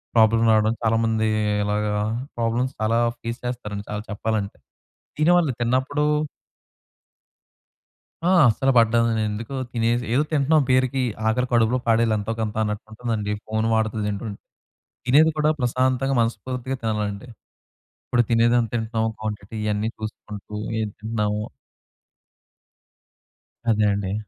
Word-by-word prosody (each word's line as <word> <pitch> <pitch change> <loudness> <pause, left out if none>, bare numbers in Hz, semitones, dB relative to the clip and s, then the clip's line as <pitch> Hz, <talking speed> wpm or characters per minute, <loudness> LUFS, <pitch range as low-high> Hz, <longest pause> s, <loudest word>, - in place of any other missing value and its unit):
Problem 115 0 +5
రావడం 110 +1 +3
చాలామంది 115 0 +2 0.4
ఇలాగా 105 0 0 0.4
ప్రాబ్లమ్స్ 120 +3 0
చాలా 115 +2 +2 0.2
ఫేస్ 115 +2 -4
చేస్తారండి. 105 -5 -4
చాలా 105 0 -4
చెప్పాలంటే 105 -1 -2 0.6
దీని 155 +3 +4
వాళ్ళు 160 -6 +2
తిన్నప్పుడు 130 +5 +1 2.2
ఆ! 185 - +4 0.2
అస్సలు 135 +4 +2
పడ్డదండి. 115 -1 +3
ఎందుకు 110 +5 -5 0.2
తినేసి 120 +1 +1
ఏదో 140 +4 +3
తింటున్నాం 155 +1 +3
పేరుకి 130 +1 +2 0.3
ఆకలి 125 +3 +1
కడుపులో 115 +1 +3
పాడేది 115 0 +3
ఎంతో 105 +2 -3
కొంత 110 -1 -2
అన్నట్టు 105 -1 -3
ఉంటుందండి. 110 -2 -3 0.2
ఫోన్ 110 0 0
వాడుతూ 110 0 0
తింటుంటే. 105 0 -4 0.7
తినేది 155 +5 +6
కూడా 150 0 +3
ప్రశాంతంగా 130 +2 +1
మనస్పూర్తిగా 120 +3 -2
తినాలండి. 105 0 -2 0.8
ఇప్పుడు 120 -1 +2
తినేది 115 +1 +4
ఎంత 115 - -1
తింటున్నాము 110 -1 -1
క్వాంటిటీ 105 0 -5
ఇవన్నీ 105 +1 0
చూసుకుంటూ 105 -1 -8 0.3
ఏం 110 - -1
తింటున్నాము 105 -1 -2 2.3
అదే 105 -1 +2
అండి. 100 -1 -2
115 Hz, 115 wpm, -23 LUFS, 105-125 Hz, 2.3 s, తినేది